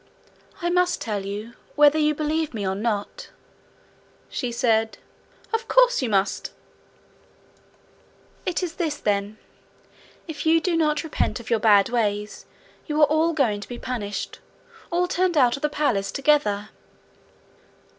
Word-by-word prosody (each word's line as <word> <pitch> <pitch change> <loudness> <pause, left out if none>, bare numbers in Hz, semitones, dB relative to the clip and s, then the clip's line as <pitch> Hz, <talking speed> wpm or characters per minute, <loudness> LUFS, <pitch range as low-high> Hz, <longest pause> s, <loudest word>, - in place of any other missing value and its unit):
'I 345 - +1
must 360 0 +2
tell 210 -3 -3
you, 210 +4 -6 0.2
whether 295 +1 +5
you 300 0 +2
believe 305 -2 -1
me 200 -3 -2
or 190 - 0
not,' 210 - -3 1.0
she 250 -3 -3
said. 225 -2 +1 0.6
'Of 450 0 -1
course - - +4
you 250 - -1
must.' 195 -1 0 2.0
'It 360 +1 -1
is 340 -2 -3
this, 310 -4 -1
then: 205 -1 -1 0.9
if 300 -3 -6
you 325 +1 +4
do 340 +1 0
not 300 -2 +1
repent 315 -5 -1
of 235 - -9
your 230 - +3
bad 205 -2 +5
ways, 210 -3 -2 0.4
you 300 -1 -1
are 300 - +8
all 315 +3 +2
going 230 -9 +1
to - - -10
be 245 - -6
punished 210 -6 -5 0.5
all 355 +1 +1
turned 360 -1 0
out 250 -4 +4
of 275 - -9
the 300 - +1
palace 235 -11 0
together.' 265 -8 +1
275 Hz, 145 wpm, -24 LUFS, 210-320 Hz, 2.0 s, are